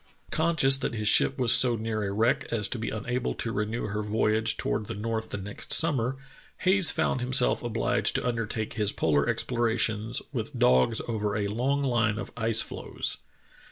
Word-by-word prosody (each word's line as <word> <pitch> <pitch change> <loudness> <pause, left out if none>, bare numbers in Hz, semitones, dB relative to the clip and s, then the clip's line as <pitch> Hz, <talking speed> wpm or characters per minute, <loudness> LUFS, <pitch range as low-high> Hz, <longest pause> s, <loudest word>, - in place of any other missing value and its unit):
Con 165 +1 0
scious 135 -2 +4
that 130 -3 -3
his 105 -1 -2
ship 135 - +5
was 125 -3 +3
so 125 -2 +7
near 110 -1 -3
a 100 - -3
wreck 125 +7 +1
as 105 -4 0
to 125 - -4
be 110 - -3
unable 125 +4 -3
to 115 - -3
renew 110 +2 -3
her 105 0 -3
voyage 110 +1 0
toward 105 - -2
the - - -5
north 110 +1 -4
the - - -5
next 100 +1 -7
summer, 135 -5 0 0.4
Hayes 190 -2 +5
found 130 - -1
himself 125 0 +2
obliged 120 +1 0
to - - -1
undertake 115 -2 -3
his 105 -1 -1
polar 75 -3 +1
explorations 115 -1 -1
with - - -5
dogs 65 - +3
over 105 -3 -2
a 100 -1 -2
long 135 +6 -1
line 115 -5 +1
of - - -6
ice 115 -1 +3
floes. - - -5
115 Hz, 185 wpm, -27 LUFS, 105-125 Hz, 0.4 s, so